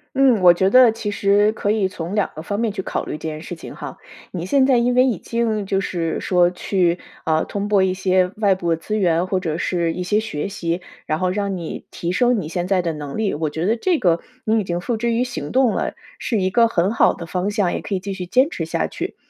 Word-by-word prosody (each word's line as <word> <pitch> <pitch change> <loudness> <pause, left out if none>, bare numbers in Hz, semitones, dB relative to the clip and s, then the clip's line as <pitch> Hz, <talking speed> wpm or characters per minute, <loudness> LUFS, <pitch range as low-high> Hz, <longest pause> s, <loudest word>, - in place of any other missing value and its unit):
嗯， 255 -6 +4
我 175 -1 +8
觉 190 +2 +2
得 255 0 +7
其 225 -2 -4
实 205 +1 +3
可 205 -2 -1
以 210 -3 +1
从 175 +1 -5
2 210 - +1
个 155 - -6
方 205 +5 -3
面 230 -1 +1
去 190 - -3
考 - - -3
虑 - - -5
这 155 +1 -4
件 155 0 -6
事 175 - -7
情 - - -10
哈。 - - -7 0.3
你 175 -2 -4
现 265 +8 +3
在 265 -1 +4
因 245 +1 +2
为 255 +1 +5
已 235 -8 0
经， 225 -2 -1
就 195 0 0
是 170 -4 -2
说 180 -1 +3
去， 180 -1 0 0.2
啊， 160 0 +1
通 205 0 -4
过 200 -2 +4
一 185 -1 +2
些 185 -1 +2
外 205 -2 +3
部 170 -3 0
资 210 +7 -3
源， 175 -3 +2
或 185 0 0
者 165 -4 -3
是 170 -1 0
一 180 - -4
些 205 +4 +1
学 200 -5 -4
习， 175 -3 -3 0.2
然 155 - -1
后 185 +1 0
让 200 0 -1
你 170 -3 -6
提 170 +1 -3
升 240 +2 +2
你 155 - -6
现 175 0 -2
在 190 -2 +2
的 170 -1 -1
能 145 -2 -6
力。 220 -2 0
我 155 0 -1
觉 160 +3 -3
得 225 +4 +2
这 350 +6 +1
个 170 -3 +2 0.2
你 220 +1 +2
已 205 - -2
经 175 -1 -2
付 230 +3 -2
之 235 +1 0
于 240 +2 +1
行 240 - -5
动 260 -2 +4
了， - - -2 0.3
是 220 -5 -1
一 185 - +1
个 230 +4 +4
很 190 -2 +1
好 230 - +4
的 170 - -8
方 180 +4 -2
向， 205 -4 0
也 - - -2
可 200 - -3
以 185 - -1
继 200 +1 -5
续 185 -2 -5
坚 260 - +3
持 - - -4
下 - - -1
去。 - - -5
190 Hz, 280 characters per minute, -21 LUFS, 175-220 Hz, 0.3 s, 我